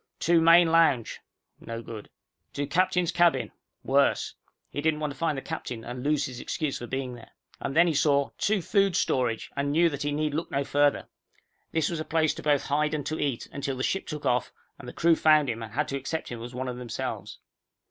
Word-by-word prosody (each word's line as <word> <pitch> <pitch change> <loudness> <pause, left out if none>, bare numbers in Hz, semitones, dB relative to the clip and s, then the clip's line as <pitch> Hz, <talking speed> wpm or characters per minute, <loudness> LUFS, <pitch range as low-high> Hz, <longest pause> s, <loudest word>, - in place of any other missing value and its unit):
TO 170 0 +3
MAIN 165 0 +6
LOUNGE 155 -8 +3 0.4
no 115 0 -7
good. 110 -3 -9 0.4
TO 145 - -2
CAPTAIN'S 180 +3 +1
CABIN 175 -1 +2 0.3
worse. - - +2 0.4
He 145 - -3
didn't 155 0 +1
want 150 -2 -2
to - - -19
find 165 -4 0
the 135 - -5
captain 115 -2 -5
and 125 +2 -6
lose 145 0 +1
his 125 -2 -7
excuse 155 0 -3
for 120 - -7
being 130 -1 -3
there. 120 -2 -12 0.3
And 135 - -4
then 170 +2 +6
he 170 - +1
saw 140 -1 +2
TO 205 -3 +1
FOOD 195 -2 +2
STORAGE 120 -4 0
and 140 0 -1
knew 165 +3 +4
that 140 0 -5
he 145 - -1
need 150 0 -1
look 160 +3 -2
no 140 - 0
further. 145 +1 +2 0.7
This 160 -1 +1
was 170 - -3
a - - -2
place 160 -1 +1
both 145 -2 +1
to - - -8
hide 150 +2 +1
and 145 - -4
to 155 +2 -3
eat, 140 -5 -2
until 140 -2 -3
the 130 - -2
ship 195 - -1
took 150 -2 -6
off, 125 -2 +1 0.3
and - - -10
the - - -6
crew 170 0 +4
found 155 -4 +4
him, 115 0 -6
and 110 - -8
had 150 +3 0
to 140 - -2
accept 140 +4 -4
him 120 -2 -6
as 120 +1 -8
one 130 +1 -3
of 125 -1 -4
themselves. 120 -2 -5
145 Hz, 225 wpm, -27 LUFS, 130-160 Hz, 0.7 s, MAIN